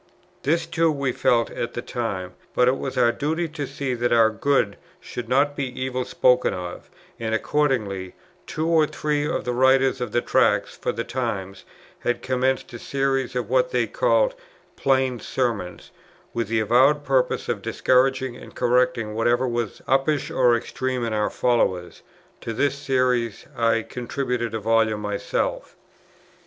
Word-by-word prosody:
This 160 Hz, +3 st, +1 dB
too 165 Hz, -1 st, +1 dB
we 140 Hz, -3 st, -1 dB
felt 120 Hz, -1 st, +2 dB
at 120 Hz, -, -4 dB
the 120 Hz, -, -2 dB
time; 95 Hz, -7 st, -4 dB, 0.2 s
but 125 Hz, -, +4 dB
it 130 Hz, +1 st, +2 dB
was 135 Hz, -, -4 dB
our 120 Hz, -2 st, +4 dB
duty 160 Hz, +6 st, -1 dB
to 150 Hz, -3 st, -5 dB
see 140 Hz, -1 st, -3 dB
that 120 Hz, 0 st, -1 dB
our 115 Hz, -1 st, +5 dB
good 110 Hz, -2 st, +1 dB, 0.2 s
should 120 Hz, -1 st, -7 dB
not 145 Hz, +2 st, +2 dB
be 130 Hz, -3 st, -4 dB
evil 130 Hz, -1 st, -2 dB
spoken 125 Hz, -5 st, +3 dB
of; 90 Hz, -1 st, -7 dB, 0.3 s
and 110 Hz, -1 st, -1 dB
accordingly, 110 Hz, -10 st, -1 dB, 0.3 s
two 155 Hz, -, -2 dB
or 160 Hz, -2 st, +4 dB
three 150 Hz, -1 st, -1 dB
of 160 Hz, -, -2 dB
the 125 Hz, -, -1 dB
writers 130 Hz, +1 st, +3 dB
of 125 Hz, -, -3 dB
the -, -, +2 dB
Tracts -, -, +2 dB
for -, -, -2 dB
the 115 Hz, -, -3 dB
Times 100 Hz, -7 st, -4 dB, 0.3 s
had 120 Hz, -, -2 dB
commenced 130 Hz, 0 st, 0 dB
a 120 Hz, -, -7 dB
Series 135 Hz, -1 st, -1 dB
of 125 Hz, -, -1 dB
what -, -, +2 dB
they -, -, +1 dB
called -, -, +2 dB, 0.4 s
"Plain 130 Hz, -2 st, +1 dB
Sermons" 115 Hz, -10 st, -3 dB, 0.4 s
with 115 Hz, -2 st, -1 dB
the 110 Hz, +1 st, +1 dB
avowed 135 Hz, +7 st, +4 dB
purpose 130 Hz, -2 st, +1 dB
of -, -, -2 dB
discouraging 130 Hz, 0 st, +1 dB
and -, -, -12 dB
correcting 125 Hz, -3 st, +1 dB
whatever 120 Hz, +3 st, +2 dB
was 120 Hz, -3 st, -3 dB
uppish 135 Hz, +2 st, +1 dB
or 125 Hz, -2 st, +4 dB
extreme 125 Hz, +1 st, -2 dB
in 115 Hz, -, -2 dB
our 105 Hz, -1 st, +1 dB
followers: 95 Hz, -8 st, 0 dB, 0.4 s
to 115 Hz, -, -5 dB
this 140 Hz, +4 st, +1 dB
Series 125 Hz, -5 st, 0 dB
I 115 Hz, -1 st, +2 dB
contributed 120 Hz, -1 st, -3 dB
a -, -, -1 dB
volume 110 Hz, 0 st, +2 dB
myself. 105 Hz, -1 st, -2 dB
125 Hz, 160 wpm, -23 LUFS, 115-135 Hz, 0.4 s, our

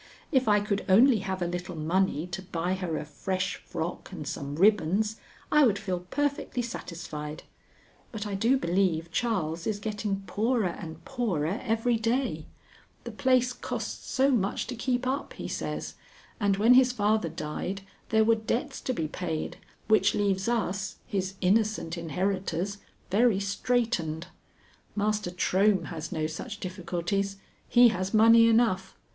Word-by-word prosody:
If 260 Hz, -5 st, +3 dB
I 210 Hz, -1 st, +5 dB
could 205 Hz, -1 st, -1 dB
only 230 Hz, +5 st, +6 dB
have 190 Hz, -1 st, -3 dB
a -, -, 0 dB
little 175 Hz, 0 st, -4 dB
money 165 Hz, 0 st, 0 dB
to 180 Hz, +1 st, -5 dB
buy 180 Hz, -1 st, -2 dB
her 180 Hz, -4 st, -2 dB
a -, -, -4 dB
fresh 185 Hz, +5 st, -2 dB
frock -, -, -5 dB
and -, -, -6 dB
some 140 Hz, 0 st, -4 dB
ribbons, 210 Hz, +3 st, +3 dB, 0.3 s
I 300 Hz, 0 st, +6 dB
would 220 Hz, -6 st, +4 dB
feel 190 Hz, -3 st, -2 dB
perfectly 285 Hz, -3 st, -1 dB
satisfied; 155 Hz, -8 st, -6 dB, 0.7 s
but 215 Hz, -2 st, -5 dB
I 205 Hz, -, -4 dB
do 230 Hz, +7 st, +3 dB
believe 170 Hz, -4 st, 0 dB
Charles 170 Hz, -8 st, -1 dB
is 215 Hz, -2 st, 0 dB
getting 205 Hz, -1 st, -3 dB
poorer 215 Hz, +2 st, +1 dB
and 160 Hz, -1 st, -8 dB
poorer 200 Hz, -, -1 dB
every 230 Hz, 0 st, +1 dB
day; 240 Hz, +4 st, -1 dB, 0.6 s
the -, -, -6 dB
place 255 Hz, -1 st, +2 dB
costs -, -, -5 dB
so 270 Hz, +2 st, +3 dB
much 205 Hz, -6 st, 0 dB
to 250 Hz, -, -5 dB
keep 250 Hz, +1 st, -1 dB
up, 265 Hz, +3 st, -2 dB
he -, -, -6 dB
says, -, -, -4 dB, 0.5 s
and 200 Hz, -2 st, +2 dB
when 225 Hz, +5 st, +6 dB
his 255 Hz, 0 st, +6 dB
father 215 Hz, -5 st, +1 dB
died 160 Hz, +5 st, -4 dB, 0.3 s
there 220 Hz, -1 st, +4 dB
were 230 Hz, +1 st, +5 dB
debts 225 Hz, +2 st, -2 dB
to 255 Hz, -, -1 dB
be 160 Hz, -9 st, -2 dB
paid 160 Hz, -1 st, -4 dB, 0.3 s
which 215 Hz, 0 st, +4 dB
leaves 195 Hz, -1 st, +1 dB
us, 200 Hz, -5 st, -1 dB
his 190 Hz, -1 st, -2 dB
innocent 200 Hz, -3 st, +1 dB
inheritors, 185 Hz, +3 st, -2 dB, 0.3 s
very 215 Hz, 0 st, +4 dB
straitened. 200 Hz, -6 st, -1 dB, 0.7 s
Master 210 Hz, -2 st, 0 dB
Trohm 190 Hz, +1 st, +2 dB
has 160 Hz, 0 st, -6 dB
no 160 Hz, -3 st, -1 dB
such 160 Hz, +6 st, -5 dB
difficulties. 185 Hz, +2 st, -2 dB, 0.3 s
He 245 Hz, 0 st, +7 dB
has 190 Hz, 0 st, -2 dB
money 230 Hz, +1 st, +7 dB
enough. 220 Hz, -5 st, +2 dB
200 Hz, 150 wpm, -28 LUFS, 180-225 Hz, 0.7 s, He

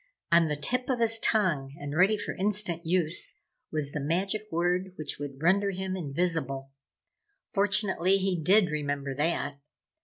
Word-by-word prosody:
On 170 Hz, -1 st, +5 dB
the 150 Hz, -, -1 dB
tip 250 Hz, -, -1 dB
of 260 Hz, -, +1 dB
his 225 Hz, -1 st, +3 dB
tongue 155 Hz, -13 st, +1 dB
and 145 Hz, +1 st, -5 dB
ready 195 Hz, +6 st, +4 dB
for -, -, -4 dB
instant 190 Hz, -4 st, -1 dB
use 170 Hz, -1 st, +1 dB, 0.3 s
was 150 Hz, -2 st, -1 dB
the 150 Hz, -, -3 dB
magic 190 Hz, +8 st, -1 dB
word 180 Hz, +2 st, 0 dB
which 155 Hz, -, -5 dB
would 140 Hz, 0 st, -7 dB
render 200 Hz, +4 st, +3 dB
him 190 Hz, 0 st, -3 dB
invisible. 145 Hz, -5 st, -2 dB, 0.8 s
Fortunately 195 Hz, -2 st, +3 dB
he 190 Hz, -1 st, 0 dB
did 185 Hz, +2 st, +4 dB
remember 145 Hz, -2 st, -2 dB
that. 145 Hz, -1 st, -1 dB
175 Hz, 150 wpm, -28 LUFS, 150-195 Hz, 0.8 s, On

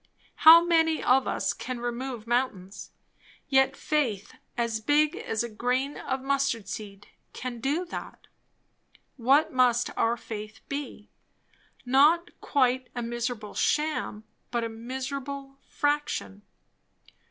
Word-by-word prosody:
How 330 Hz, +2 st, +9 dB
many 325 Hz, -2 st, +2 dB
of 255 Hz, +1 st, +3 dB
us -, -, 0 dB
can 255 Hz, -1 st, -6 dB
remove 240 Hz, -1 st, -4 dB
mountains? 230 Hz, -6 st, -2 dB, 0.6 s
Yet 265 Hz, -1 st, +3 dB
faith 240 Hz, -10 st, -1 dB, 0.2 s
as 235 Hz, -2 st, 0 dB
big 295 Hz, +6 st, +3 dB
as 220 Hz, +1 st, -2 dB
a -, -, -3 dB
grain 250 Hz, +5 st, -1 dB
of 265 Hz, 0 st, -4 dB
mustard 270 Hz, -6 st, 0 dB
seed 200 Hz, 0 st, -8 dB, 0.3 s
can 250 Hz, -2 st, -6 dB
do 290 Hz, +9 st, -1 dB
that. 350 Hz, -, -8 dB, 0.9 s
What 275 Hz, +6 st, +3 dB
must 245 Hz, -1 st, +3 dB
our 230 Hz, +1 st, +1 dB
faith 215 Hz, -2 st, -8 dB
be? 280 Hz, -7 st, -6 dB, 0.7 s
Not 295 Hz, +7 st, +4 dB
quite 255 Hz, -2 st, +1 dB
a 240 Hz, -, -3 dB
miserable 235 Hz, -2 st, -4 dB
sham, 300 Hz, -8 st, -1 dB, 0.3 s
but 235 Hz, -1 st, -1 dB
a 230 Hz, -, -2 dB
miserable 270 Hz, +4 st, -6 dB
fraction. 290 Hz, -8 st, -1 dB
255 Hz, 120 wpm, -27 LUFS, 230-280 Hz, 0.9 s, How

